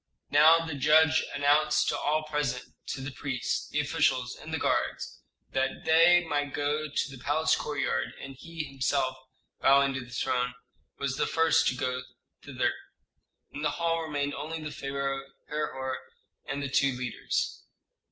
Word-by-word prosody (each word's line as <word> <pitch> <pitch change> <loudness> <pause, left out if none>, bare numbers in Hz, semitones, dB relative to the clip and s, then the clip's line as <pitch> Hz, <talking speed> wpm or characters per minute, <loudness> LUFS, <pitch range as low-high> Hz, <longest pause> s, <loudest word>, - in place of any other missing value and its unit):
Now 160 +3 +6
the 160 - -4
judge 155 +3 +4
announced 145 +2 +3
to - - 0
all 155 +1 +1
present 150 -5 -2
to 135 - -4
the 135 +1 -5
priests, 130 -2 -3
the - - -1
officials, - - +1
and - - -10
the - - 0
guards - - -1 0.3
that 130 0 -1
they 170 +2 +6
might 145 -2 -1
go 150 +1 -1
to 140 0 -1
the 135 -2 -11
palace 155 +3 +2
courtyard; 145 -2 -2
and 135 0 -8
he 165 +4 -6
himself, 135 -1 0 0.5
bowing 140 0 +5
to 130 - -3
the 120 - -14
throne, 125 +1 -1 0.4
was 140 -1 -2
the - - +1
first 165 0 +3
to - - +1
go 125 0 -2 0.4
thither. - - -1 0.8
In 145 - -7
the 150 - +1
hall 165 -1 +1
remained 145 -2 -2
only 155 +3 -5
the 155 -1 -6
pharaoh, 135 -1 -3 0.3
Herhor, 130 -4 -3 0.5
and 140 0 -3
the - - -1
two 135 0 +3
leaders. 125 -1 -3
145 Hz, 160 wpm, -29 LUFS, 135-155 Hz, 0.8 s, Now